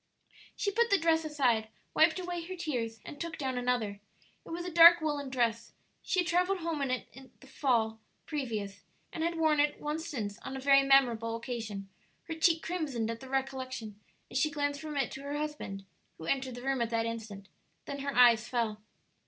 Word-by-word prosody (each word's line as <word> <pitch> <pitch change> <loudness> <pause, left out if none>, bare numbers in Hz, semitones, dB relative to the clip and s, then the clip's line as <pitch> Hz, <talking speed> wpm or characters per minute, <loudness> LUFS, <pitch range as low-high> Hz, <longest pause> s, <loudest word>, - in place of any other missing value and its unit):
She 405 - -1
put 470 +3 +2
the 400 - +5
dress 325 -1 +2
aside, 250 -8 +1 0.3
wiped 315 +2 +4
away 355 -1 -3
her 370 +2 -6
tears, 240 - -3
and 290 - -8
took 335 -1 -4
down 265 -4 -2
another. 245 -5 -1 0.4
It - - -14
was 345 +1 -4
a 360 - -4
dark 340 +1 +9
woollen 295 -3 -2
dress. 235 -3 -1 0.3
She 370 - +1
had 350 - -3
travelled 360 +2 +1
home 325 -3 -2
in 275 - 0
it 255 0 -3 0.3
the 240 -5 0 0.3
previous 225 -9 -3
fall, - - -27 0.3
and 320 - -2
had 335 0 -1
worn 315 -2 +3
it 290 0 +2
once 305 +2 -3
since 210 -7 -4
on 265 - -6
a - - -5
very 275 +1 +6
memorable 240 -5 +3
occasion; 225 -5 -5 0.4
her 325 - -5
cheek 320 0 +2
crimsoned 280 -10 -2
at 230 - -6
the 265 - -11
recollection 260 -5 -3 0.3
as - - 0
she 305 - +3
glanced 285 -1 -2
from 305 -2 -5
it 270 - 0
to 270 - -7
her 285 +1 -4
husband, 295 -11 -5 0.3
who 160 - -9
entered 260 +3 -1
the 245 - -9
room 270 -2 0
at 235 - 0
that 230 -1 0
instant; 220 -4 -6 0.4
then 280 - -5
her 280 0 -3
eyes 235 -3 +6
fell. 225 -4 -1
270 Hz, 200 wpm, -31 LUFS, 230-315 Hz, 0.4 s, dark